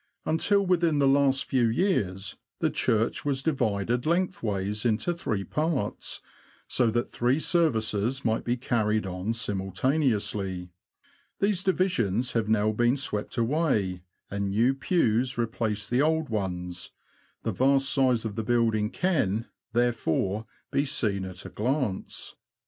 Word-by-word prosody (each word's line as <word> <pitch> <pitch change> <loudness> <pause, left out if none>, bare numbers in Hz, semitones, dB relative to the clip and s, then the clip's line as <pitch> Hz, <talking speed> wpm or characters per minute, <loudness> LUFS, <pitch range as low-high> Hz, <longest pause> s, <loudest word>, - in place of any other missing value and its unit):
Until 200 +5 +2
within 170 -4 +2
the 140 -1 +4
last 135 -1 +3
few 125 -3 +2
years 105 - 0 0.2
the - - +1
church 110 +1 0
was 135 -2 -1
divided 120 -4 0
lengthways 105 - -1
into 120 +9 +1
three 110 -12 -2
parts, 150 - -2 0.5
so 125 -3 +2
that 120 +2 -1
three 125 +5 +1
services 130 - +1
might 110 -1 +1
be 120 +1 0
carried 110 -4 0
on 95 +3 -3
simultaneously. 100 - -1 0.7
These 195 -2 +1
divisions 130 - +1
have 115 -2 0
now 110 0 +3
been 120 +4 +2
swept 105 -6 -3
away, 115 - +1 0.3
and 100 0 -1
new 115 +6 +3
pews 130 -4 +1
replace 110 -3 -1
the 125 +2 +2
old 160 0 +1
ones; 90 -4 -3 0.5
the - - -1
vast 135 +1 +3
size 130 -5 +2
of 105 -2 -4
the 110 - -2
building 110 -2 +2
can, 115 - 0 0.3
there 120 +1 +3
fore, 100 +1 -1 0.2
be 140 - +2
seen 105 -9 0
at 90 -1 -7
a - - -6
glance. 125 -3 -2
115 Hz, 135 wpm, -27 LUFS, 105-140 Hz, 0.7 s, the